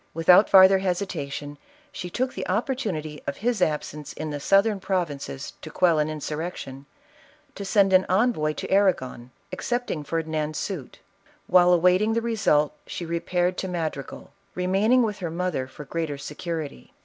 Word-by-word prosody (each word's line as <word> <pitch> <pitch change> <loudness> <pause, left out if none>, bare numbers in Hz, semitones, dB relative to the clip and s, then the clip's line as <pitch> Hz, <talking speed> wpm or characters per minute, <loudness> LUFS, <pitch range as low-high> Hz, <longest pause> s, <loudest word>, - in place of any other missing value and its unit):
Without 180 +5 +6
farther 190 0 +7
hesitation, 155 -6 -3 0.3
she 180 - -6
took 255 +7 -2
the - - -5
opportunity 185 - -2
of 140 - -3
his 235 -2 -1
ab 155 -4 +1
sence 150 -1 -8
in 155 -1 -5
the 145 - -4
southern 200 +6 +3
provinces 155 - -3
to - - -8
qut'll 170 -4 +3
an 150 - +1
insurrec 155 +3 -4
tion, 135 +1 -9 0.7
to 200 - -7
send 195 -1 +3
an 185 0 +5
envoy 185 -6 +2
to - - -6
Arragon, 130 -11 +1 0.2
accepting 240 -11 -2
Ferdi 160 +2 -3
nand's 155 -1 -2
suit. 175 -10 -5 0.5
While 180 0 +5
awaiting 180 +5 +4
the 230 - +1
result 200 -11 +2
she 175 - -5
repaired 175 +2 -1
to 190 - -3
Madrigal, 160 -6 -5 0.2
remaining 195 +7 +3
with 210 -2 -2
her 175 -3 -3
mother 170 -5 -2
for 145 +3 -11
greater 160 -2 -3
secu 165 +4 -5
rity. 60 - -17
175 Hz, 160 wpm, -25 LUFS, 150-195 Hz, 0.7 s, farther